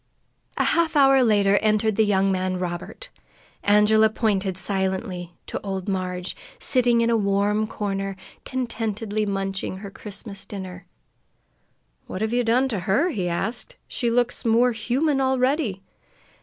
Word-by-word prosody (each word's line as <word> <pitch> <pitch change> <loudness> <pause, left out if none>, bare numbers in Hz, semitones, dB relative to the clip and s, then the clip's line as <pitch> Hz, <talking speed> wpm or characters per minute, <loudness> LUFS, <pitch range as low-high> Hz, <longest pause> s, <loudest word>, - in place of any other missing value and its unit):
A - - +2
half 335 -2 +1
hour 270 -2 +6
later 205 -3 +4
entered 215 0 +2
the 220 - +4
young 195 -1 +2
man 185 0 -1
Robert. 180 - -5 0.5
Angela 210 +1 +5
pointed 200 -4 0
silently 190 -2 -2
to - - -5
old 195 -1 -4
Marg, 185 -2 -2 0.3
sitting 240 -2 +2
in 230 0 +2
a - - +3
warm 205 +1 +1
corner, 195 -2 -3 0.3
contentedly 220 -4 -2
munching 195 -1 -3
her 200 0 -8
Christmas 200 0 -8
dinner. 185 -3 -8 1.2
"What 190 - -4
have 220 +1 -1
you 245 0 +2
done 245 +3 +3
to 215 -6 -1
her?" 285 - +3
he 185 - -2
asked. 220 - -3
"She 240 - -1
looks 245 +1 0
more 235 +1 +4
human 265 +6 0
already." 260 - +1
210 Hz, 140 wpm, -24 LUFS, 195-240 Hz, 1.2 s, hour